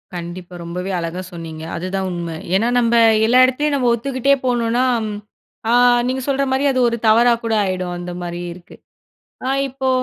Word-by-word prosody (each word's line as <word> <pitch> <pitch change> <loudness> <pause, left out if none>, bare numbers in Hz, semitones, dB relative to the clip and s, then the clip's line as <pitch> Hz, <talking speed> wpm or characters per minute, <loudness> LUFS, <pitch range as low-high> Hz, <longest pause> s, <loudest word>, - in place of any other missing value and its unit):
கண்டிப்பா. 175 +1 -7
ரொம்பவே 180 +3 -5
அழகா 170 +2 -4
சொன்னீங்க. 160 -2 -8
அதுதான் 190 +2 -3
உண்ம. 170 -2 -4 0.2
ஏன்னா 220 +5 +2
நம்ப 235 -1 +2 0.3
எல்லா 245 +3 +4
இடத்துலயும் 285 +3 0
நம்ம 250 -3 +1
ஒத்துக்கிட்டே 260 +3 +1
போணுன்னா, 240 0 +1 0.9
ஆ - - +4 0.3
நீங்க 260 +1 -2
சொல்ற 275 0 +1
மாரி 265 +1 +1
அது 255 - 0
ஒரு 235 - -2
தவறா 235 +2 +5
கூட 225 -1 -1
ஆயிடும். 185 -1 -3
அந்தமாரி 175 0 -6
இருக்கு. 175 0 -15 0.7
ஆ - - 0 0.2
இப்போ 265 0 -3
220 Hz, 155 wpm, -19 LUFS, 175-255 Hz, 0.9 s, தவறா